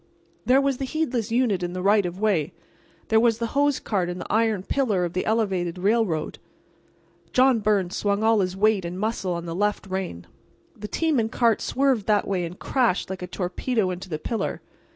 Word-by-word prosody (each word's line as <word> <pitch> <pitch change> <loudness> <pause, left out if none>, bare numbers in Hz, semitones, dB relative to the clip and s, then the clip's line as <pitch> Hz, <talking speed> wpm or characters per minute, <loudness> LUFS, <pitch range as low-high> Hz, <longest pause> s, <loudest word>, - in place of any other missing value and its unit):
There 260 +2 +6
was 275 -2 +1
the 270 - -2
heedless 260 -7 -2
unit 230 -6 +1
in 175 0 -3
the 185 - -4
right 200 -1 +4
of 175 +2 -7
way; 195 -9 +1 0.6
there 220 -1 +5
was 230 -1 +3
the 230 - -2
hose 285 0 +2
cart 185 -5 -1
and 180 +1 -5
the - - -6
iron 220 -3 +2
pillar 210 -8 0
of 170 - -5
the 185 - -2
elevated 190 -6 0
railroad. 195 -5 0 0.9
John 255 -2 +4
Byrnes 200 -4 +1
swung 205 +1 0
all 225 -1 +4
his 185 -1 -1
weight 210 -1 +3
and 175 +2 -5
muscle 210 -4 -1
on 170 0 -4
the 165 - -4
left 205 +4 -1
rein. 185 - -4 0.5
The 210 - -7
team 315 +2 +1
and 225 0 -1
cart 230 -3 +2
swerved 260 -6 +1
that 210 -1 +2
way 185 -3 -1
and 170 +2 -8
crashed 235 -8 0
like 190 - -6
a 180 - -5
torpedo 185 +3 -1
into 180 +1 -7
the 155 - -2
pillar. 225 +8 -3
205 Hz, 200 wpm, -24 LUFS, 180-230 Hz, 0.9 s, There